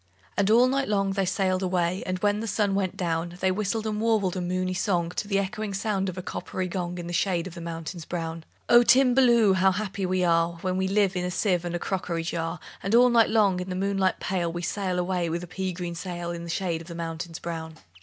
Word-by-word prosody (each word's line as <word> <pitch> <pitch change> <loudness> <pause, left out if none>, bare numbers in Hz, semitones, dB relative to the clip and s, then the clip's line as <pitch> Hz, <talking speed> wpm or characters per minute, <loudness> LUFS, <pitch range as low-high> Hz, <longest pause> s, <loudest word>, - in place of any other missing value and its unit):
And 200 0 +2
all 235 +3 +6
night 270 +1 0
long 195 -2 +1
they 195 -1 0
sailed 185 -1 +1
away; 180 0 0
And 185 0 -1
when 205 0 +2
the 225 - -4
sun 205 -1 +1
went 195 -1 -1
down, 170 -1 -2
They 190 0 +2
whistled 215 +3 -1
and 215 -1 -2
warbled 215 -5 +1
a 185 - -2
moony 185 +1 -1
song 175 -2 0
To 205 - -4
the 200 -1 +1
echoing 200 +1 -2
sound 195 -1 -1
of 185 - -7
a 185 - -4
coppery 185 0 -4
gong, 180 -1 -3
In 175 - -5
the 175 - -5
shade 175 -1 +1
of 185 - -7
the 170 - -8
mountains 165 0 -6
brown. 165 -1 -4 0.2
"O 240 0 +8
Timballoo! 240 -3 +5
How 190 +1 +4
happy 195 0 -3
we 185 0 +1
are 170 0 +3
When 185 -1 0
we 190 0 +1
live 195 -1 +2
in 180 - -1
a 180 - -1
sieve 180 -1 0
and 175 0 -3
a - - +1
crockery 175 -2 -2
jar! 165 0 -3 0.2
And 195 +4 +1
all 250 +1 +7
night 230 -1 +5
long, 205 -5 +3
in 180 +1 -5
the 185 - -3
moonlight 195 0 0
pale, 175 -3 -1
We 175 +1 -5
sail 185 -1 -1
away 180 -1 0
with 170 +2 -2
a - - -7
pea 185 +1 -3
green 175 -1 -5
sail 175 0 -5
In 170 0 -6
the - - -8
shade 170 -1 -1
of 165 - -12
the 170 - -7
mountains 165 0 -5
brown." 160 -1 -6
185 Hz, 245 wpm, -26 LUFS, 175-200 Hz, 0.2 s, O